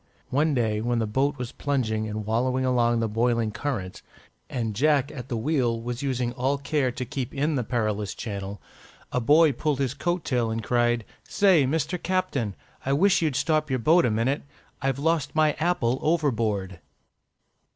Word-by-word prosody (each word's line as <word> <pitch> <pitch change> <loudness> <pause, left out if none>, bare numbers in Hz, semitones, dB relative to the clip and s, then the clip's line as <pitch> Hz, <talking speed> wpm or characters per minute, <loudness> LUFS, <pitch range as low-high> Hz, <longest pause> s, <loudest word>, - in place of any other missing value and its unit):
One 150 +2 +2
day, 110 -3 0
when 120 +1 0
the 115 - +1
boat 135 +7 0
was 125 -1 -5
plunging 110 -6 -1
and 105 0 -4
wallowing 125 +4 0
along 120 -2 +2
the 115 - +1
boiling 115 0 +1
current, 105 -7 -4 0.5
and 115 -4 -3
Jack 145 +2 +2
at 125 -1 -8
the 120 - -1
wheel 120 -2 0
was 120 +2 -5
using 125 -3 -1
all 130 +3 0
care 140 -2 0
to 125 +1 -5
keep 135 -1 -5
in 145 +3 +1
the 130 -4 0
perilous 105 -3 -2
channel, 100 -2 -5 0.5
a 125 - 0
boy 150 +5 +5
pulled 145 +2 -1
his 135 -3 -1
coat 175 -1 -2
tail 120 -4 0
and 110 0 -3
cried, 120 -1 +1 0.2
"Say, 185 -9 +4
Mister 160 +5 -1
Captain! 140 - -1 0.3
I 135 - 0
wish 185 +7 +4
you'd 155 -5 0
stop 155 +1 +1
your 130 - +1
boat 160 +9 +4
a 125 - +2
minute. 115 +6 0 0.4
_I've 135 -1 0
lost 155 0 0
my 155 -1 +4
apple 135 -7 +1
overboard. 110 - 0
125 Hz, 175 wpm, -26 LUFS, 115-145 Hz, 0.5 s, boy